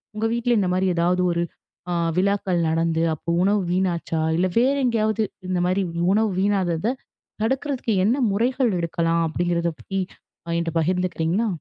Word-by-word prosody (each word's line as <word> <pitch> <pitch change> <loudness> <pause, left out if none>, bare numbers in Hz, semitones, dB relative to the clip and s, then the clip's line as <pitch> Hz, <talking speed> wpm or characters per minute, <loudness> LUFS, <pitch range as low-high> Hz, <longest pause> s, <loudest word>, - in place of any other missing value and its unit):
உங்க 215 +1 -1
வீட்ல 235 0 +1
இந்தமாரி 185 -1 +1
ஏதாவது 175 +2 +2
ஒரு 170 0 0 0.5
ஆ - - 0 0.2
விழாக்கள் 195 -1 +1
நடந்து, 165 0 +1
அப்போ 155 - -7
உணவு 200 +1 +2
வீணாச்சா? 175 -3 0 0.2
இல்ல 185 +2 +2
வேற 260 +3 +3
எங்காவது 220 -2 +1 0.3
இந்தமாரி 185 +1 +1 0.3
உணவு 215 0 +2
வீணாகுறத 195 +2 +1 0.5
தடுக்க 265 +3 -1 0.2
என்ன 235 +6 +2
முறைகள் 245 +4 +1
எடுக்கலாம் 165 0 0
அப்பிடிங்கிறத 170 +1 0
பத்தி 195 +12 -4 0.5
அ - - -3
என்ட்ட 170 -1 -2
பகிர்ந்துக்கிறீங்களா? 180 +4 0
185 Hz, 135 wpm, -23 LUFS, 170-220 Hz, 0.5 s, வேற